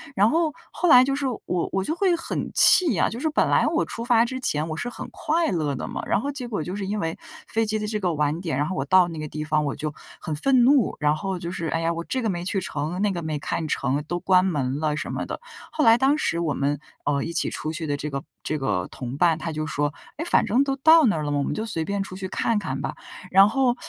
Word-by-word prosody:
然 205 +2 +4
后 325 -1 +1 0.2
后 355 - 0
来 250 -2 +9
就 275 +1 0
是 280 -1 -1 0.2
我 180 -1 -1
我 190 0 0
就 315 - -2
会 365 -2 +2
很 335 - -4
气 315 - +7
啊， - - +2
就 230 - -6
是 315 +3 0
本 - - +2
来 - - +3
我 - - +1
出 230 - -6
发 235 -1 +4
之 260 +2 -4
前 155 -9 -1
我 155 - -3
是 245 +9 -4
很 - - -8
快 330 -2 0
乐 150 -5 -1
的 - - -5
嘛， - - -5
然 - - +2
后 280 +6 -3
结 260 -3 -6
果 205 -9 -3
就 180 +4 -5
是 200 -2 -4
因 210 +1 -2
为 165 -2 -3 0.3
飞 225 0 0
机 215 0 0
的 210 - -3
这 210 0 -2
个 180 -3 0
晚 150 +3 0
点， 160 -7 -2
然 145 - +1
后 185 - -3
我 135 0 -2
到 185 +3 +5
那 160 - -7
个 155 - -4
地 155 +1 -5
方 155 -1 0
我 140 - -2
就 150 -1 -4 0.3
很 160 - -5
愤 255 - +3
怒， 265 -4 +4
然 150 0 +2
后 190 +3 -3
就 170 0 -5
是 165 -2 -4
哎 165 - -1
呀 165 +1 0
我 170 - -4
这 260 -2 -2
个 220 - 0
没 175 -2 -3
去 195 +1 -1
成， 160 +1 -4
那 205 - +2
个 175 -2 -4
没 155 -2 -3
看 155 +2 -3
成， 145 0 -1
都 175 - -2
关 185 0 +3
门 140 -5 -1
了 150 -1 -1
什 - - -4
么 - - -3
的， - - -5 0.3
后 300 - 0
来 225 0 +7
当 275 +3 +3
时 170 - 0
我 160 -4 0
们， 145 +1 -1 0.3
呃， 140 -1 +1
一 170 - -5
起 - - 0
出 155 - -4
去 160 0 -5
的 145 -1 -1
这 150 +1 -4
个 140 0 -4 0.2
这 155 - -2
个 100 -9 -1
同 125 0 -6
伴， 165 -2 +3
他 165 0 -4
就 155 0 -3
说， 145 -1 -1 0.2
诶 325 - -3
反 345 - +3
正 245 +6 +3
都 275 -1 -1
到 320 +4 +6
那 190 -8 +2
儿 - - -2
了， 145 - -2
我 145 -1 0
们 - - -2
就 220 +1 -4
随 165 -7 -2
便 200 0 -2
出 185 -1 -6
去 190 0 -5
看 220 +3 0
看 135 -9 -3
吧。 - - -4 0.3
然 195 +2 +7
后 245 +2 +2
180 Hz, 305 characters per minute, -24 LUFS, 155-230 Hz, 0.3 s, 来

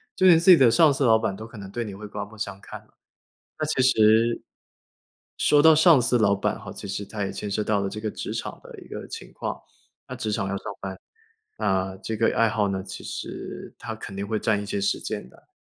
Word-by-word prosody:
就 185 - +4
连 170 -3 +8
自 175 +3 +6
己 - - +11
的 130 -5 +6
上 155 +4 +5
司 135 - -1
老 115 -3 +6
板 110 -3 -2
都 110 +3 -9
可 115 - -13
能 100 -1 -9
对 120 +3 -3
你 105 -3 -7
会 105 +2 -8
刮 105 0 -5
目 105 +2 -12
相 100 -2 -5
看 - - -9
了。 - - -29 0.7
那 155 - 0
其 145 -4 +1
实， 115 0 +4 1.0
说 145 -1 +4
到 160 +1 +7
上 160 -3 +6
司 125 0 +2
老 105 -3 +3
板 100 - -2
哈， 100 -3 -9
其 105 - -8
实 100 +1 -4
他 105 0 -4
也 95 - -2
牵 105 - -5
涉 105 +1 -1
到 105 -1 +1
了 100 - -1
这 105 - -7
个 110 - -2
职 - - -6
场 - - -5
的 - - -12
一 - - -13
个 - - -7
情 - - -9
况， - - -5 0.5
那 130 - -6
职 110 -3 -3
场 100 -2 -1
要 100 - -2
上 - - -12 0.2
班， 95 -1 -6 0.6
那 95 0 0
这 110 +3 -5
个 115 - +2
爱 115 -1 +3
好 105 -2 +1
呢， 95 -1 -3
其 95 -1 -9
实 - - -7
它 - - -6
肯 - - -9
定 100 +1 -4
会 110 0 -1
占 105 -1 +1
一 - - -6
些 100 0 -3
时 100 - 0
间 65 - -5
的， - - -22
110 Hz, 275 characters per minute, -25 LUFS, 100-120 Hz, 1.0 s, 己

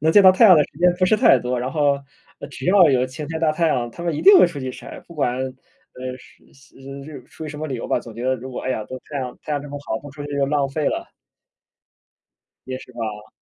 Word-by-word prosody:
能 160 +2 +2
见 205 - +7
到 185 - +9
太 205 +5 +4
阳 185 -5 +9
的 150 - +5
时 145 - -16
间 180 +1 +4
不 185 - +3
是 215 - +3
太 215 - +5
多， 125 +1 -2
然 125 +2 -3
后 145 -3 +2 0.5
只 - - -7
要 180 -4 +6
有 130 -1 +2
晴 145 +4 -7
天 160 0 -4
大 160 -2 +3
太 165 +1 +1
阳， 120 -5 -1
他 170 - -9
们 170 -2 -1
一 - - -4
定 395 -1 +9
会 - - +7
出 165 -4 -7
去 130 0 -4
晒， - - -10
不 170 - -12
管， 125 -5 0
呃， 130 -1 -8
是， - - -21
嘶， 135 0 -22
呃， 135 0 -9
出 160 - -10
于 - - -7
什 150 0 -8
么 155 - -4
理 135 - -4
由 115 - -5
吧， - - +2
总 115 -2 -11
觉 120 - -7
得 130 0 +2
如 130 +2 -9
果， 125 - -5
哎 130 - -2
呀， 110 -4 -2
都 130 +3 -8
太 145 - -3
阳 125 -2 -5
太 155 - -5
阳 145 -1 -1
这 145 - -9
么 145 0 -6
好， 110 - -2
不 145 0 -11
出 145 +1 -9
去 145 - -7
就 140 -1 +1
浪 145 -1 0
费 145 +2 -2
了。 - - -4 1.6
也 130 0 -4
是 - - -14
吧。 110 -2 -6
140 Hz, 305 characters per minute, -21 LUFS, 130-155 Hz, 1.6 s, 到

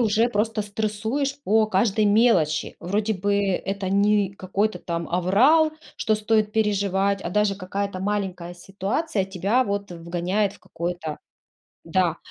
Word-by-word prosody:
уже 225 +1 +3
просто 220 -1 0
стрессуешь 220 +7 -2
по 220 0 +3
каждой 210 +1 +2
мелочи. 205 -8 +3
Вроде 205 +5 -1
бы 200 +1 0
это 195 0 -1
не 200 0 +3
какой-то 200 +3 -1
там 170 -1 -4
аврал, 245 - +4 0.2
что 220 - +1
стоит 215 0 +1
переживать, 200 -2 +1
а - - -3
даже 205 +2 +1
какая-то 195 +1 -4
маленькая 190 -3 -3
ситуация 195 - -2
тебя 195 +7 +1
вот 200 -2 -3
вгоняет 175 +4 -1
в - - -18
какое-то 170 -2 -5 0.7
да. 170 0 +1
200 Hz, 130 wpm, -24 LUFS, 185-215 Hz, 0.7 s, аврал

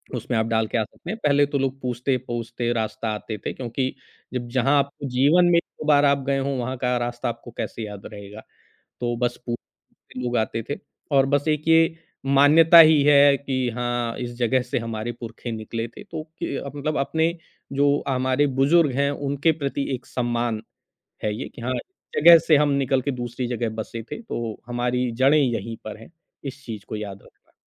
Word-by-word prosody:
उसमें - - -2
आप 110 - +1
डाल 110 -1 +1
के 120 - -1
आ 110 - +2
सकते 115 +10 -12
हैं। 220 - -4
पहले 145 -1 +4
तो 145 0 -2
लोग 135 0 -1
पूछते-पूछते 120 -1 -2
रास्ता 110 0 -2
आते 105 0 -6
थे - - -2
क्योंकि 130 +1 -3 0.4
जब 125 -1 -3
जहाँ 135 +3 +2
आपको 140 0 -3
जीवन 145 +8 +4
में 170 - +5
1-2 170 - -4
बार 145 -1 +5
आप 140 0 +3
गए 140 0 +2
हो 135 +1 -1
वहाँ 130 +1 -3
का 125 -1 +1
रास्ता 120 0 -2
आपको 120 +1 -8
कैसे 115 - -4
याद 105 -1 -9
रहेगा? 105 +1 -9 0.6
तो 120 -1 -1
बस 120 0 -1
पू 120 - -1 0.6
लोग 125 -1 -2
आते 110 +1 -1
थे 145 - -1 0.4
और 135 0 +5
बस 145 +2 +1
एक 150 0 0
ये 165 +1 +5 0.3
मान्यता 150 +5 +7
ही 155 -2 +8
है 140 -1 +6
कि 130 -2 -2
हाँ, 120 -1 -2
इस 120 -1 -5
जगह 125 +1 +2
से 125 - -2
हमारे 115 0 -4
पूरखे 115 0 -6
निकले 115 +1 -4
थे 160 - -12
तो 165 -6 -6 0.2
कि - - -3 0.2
मतलब 150 +2 -2
अपने 160 +4 0 0.4
जो 140 +1 +2
हमारे 130 +2 +2
बुज़ुर्ग 145 +2 +4
हैं 140 +1 +2
उनके 145 +2 0
प्रति 140 -2 -3
एक 125 - -7
सम्मान 120 -2 -1 0.6
है 105 - 0
ये - - -5
कि - - -9
हाँ, 130 +2 -1 0.4
जगह 170 +2 +9
से 155 -1 +4
हम 150 0 +3
निकल 135 0 +1
के 140 +2 -1
दूसरी 120 0 -4
जगह 120 -1 -2
बसे 115 +1 -5
थे - - -5
तो 120 - -5
हमारी 125 +1 -1
जड़ें 150 +3 +6
यहीं 115 -4 -1
पर 110 -1 -6
हैं। 115 - -14 0.3
इस 135 0 -7
चीज़ 110 -4 -7
को - - -3
याद 100 -2 -6
रखना। - - -24
130 Hz, 195 wpm, -23 LUFS, 120-145 Hz, 0.6 s, जगह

